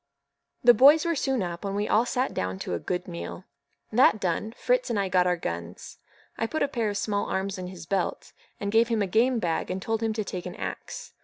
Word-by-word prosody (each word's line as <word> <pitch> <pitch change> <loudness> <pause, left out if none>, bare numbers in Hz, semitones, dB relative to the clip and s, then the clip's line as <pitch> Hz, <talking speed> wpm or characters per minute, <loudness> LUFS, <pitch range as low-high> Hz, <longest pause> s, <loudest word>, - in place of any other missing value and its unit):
The 240 - +8
boys 290 +6 +7
were 340 - +2
soon 265 - 0
up, 170 0 -5
and 200 0 -3
we 205 +1 0
all 230 +3 +3
sat 255 +1 -1
down 95 0 -2
to - - -3
a 85 - -1
good 180 - -3
meal. 175 +1 -6 0.5
That 220 -2 +5
done, 190 +4 -1
Fritz - - 0
and 225 -4 0
I 195 -1 0
got 180 -1 +3
our 180 0 +2
guns. 85 - -6 0.4
I 225 - 0
put 315 +5 -1
a - - +2
pair 235 -6 -1
of 205 - -3
small 205 -1 -1
arms 190 0 -2
in 180 - -5
his 180 -3 -9
belt, 190 +1 -2 0.3
gave 225 +3 +4
him 225 -3 +1
a - - +1
game 235 +6 +2
bag, 170 -7 -1
and 185 - -2
told 225 +3 -2
him 225 -1 0
to 215 0 -2
take 180 -2 -5
an 180 - -7
axe. 95 -1 -6
200 Hz, 235 wpm, -27 LUFS, 180-235 Hz, 0.5 s, The